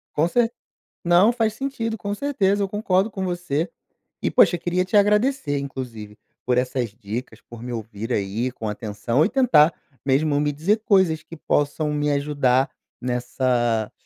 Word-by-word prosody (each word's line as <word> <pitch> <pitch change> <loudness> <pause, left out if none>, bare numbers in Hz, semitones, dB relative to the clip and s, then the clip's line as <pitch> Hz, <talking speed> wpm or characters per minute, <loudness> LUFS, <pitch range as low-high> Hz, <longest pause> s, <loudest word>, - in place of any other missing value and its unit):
Concer 225 +10 +2 0.5
Não, 175 +6 +5
faz 225 -3 0
sentido, 230 -3 -3
com 205 0 -4
certeza, 205 -7 +1
eu 195 - 0
concordo 200 0 +1
com 190 -1 -4
você. 175 -2 -2 0.5
E - - 0
poxa, 175 - +5
eu - - -6
queria 180 +1 0
te 195 +3 +2
agradecer 210 - +2
inclusive, 115 -6 -7 0.3
por 125 0 +1
essas 125 -2 -1
dicas, 110 +1 -7
por 120 -1 -10
me 125 - -5
ouvir 110 +1 -6
aí 105 +5 -1
com 110 -3 -6
atenção 115 +6 -1
e - - 0
tentar 225 - +4 0.3
mesmo 145 +2 +2
me 150 0 +1
dizer 190 +10 0
coisas 190 -8 +3
que 165 - -11
possam 150 +1 0
me 150 0 0
ajudar 140 -2 +1 0.3
nessa 125 -2 0
150 Hz, 160 wpm, -23 LUFS, 125-195 Hz, 0.5 s, Não